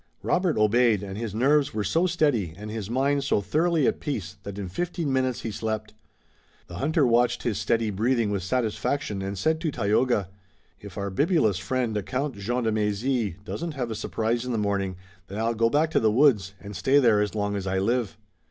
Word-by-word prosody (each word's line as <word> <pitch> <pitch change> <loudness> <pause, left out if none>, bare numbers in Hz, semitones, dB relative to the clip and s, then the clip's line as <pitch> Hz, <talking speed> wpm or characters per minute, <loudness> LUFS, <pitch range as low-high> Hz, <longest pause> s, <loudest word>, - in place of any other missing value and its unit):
Robert 180 -3 +1
obeyed 110 -1 +3
and 95 -1 -6
his 110 -1 -4
nerves 140 +2 +2
were 105 - 0
so 165 - +2
steady 140 - +1
and 105 +1 -7
his 110 -2 -5
mind 140 +3 +1
so 140 - +2
thoroughly 160 - +1
at - - +1
peace 100 - -4
that 100 0 -7
in 100 -2 -4
fifteen 165 - -2
minutes 130 -2 0
he 115 - -4
slept. 110 0 -4 0.7
The 85 0 -9
hunter 150 - +2
watched 120 0 +2
his 110 -5 -1
steady 110 +1 +1
breathing 115 +2 +1
with 100 -2 -1
satisfaction 110 +1 -1
and 95 +1 -4
said 160 +11 +1
to 165 - 0
Tayoga: 110 - +1 0.5
"If 100 -3 -11
our 100 -1 -3
bibulous 140 - +2
friend, 110 0 -1
Count 135 +1 -2
Jean 120 +5 -2
de 110 - +1
Mézy, 105 0 0
doesn't 165 +6 -4
have 125 -4 -3
a - - -3
surprise 115 +2 -1
in 125 - -4
the - - 0
morning, 100 -3 -1 0.3
then 100 - -7
I'll 115 +1 0
go 115 0 +2
back 155 +5 +2
to - - +3
the 110 - +3
woods, 105 -7 +3
and 105 0 -9
stay 135 +9 +3
there 115 -7 +5
as 105 0 -2
long 105 -1 -1
as 95 -1 -3
I 95 0 0
live." 115 +2 0
115 Hz, 205 wpm, -26 LUFS, 100-130 Hz, 0.7 s, there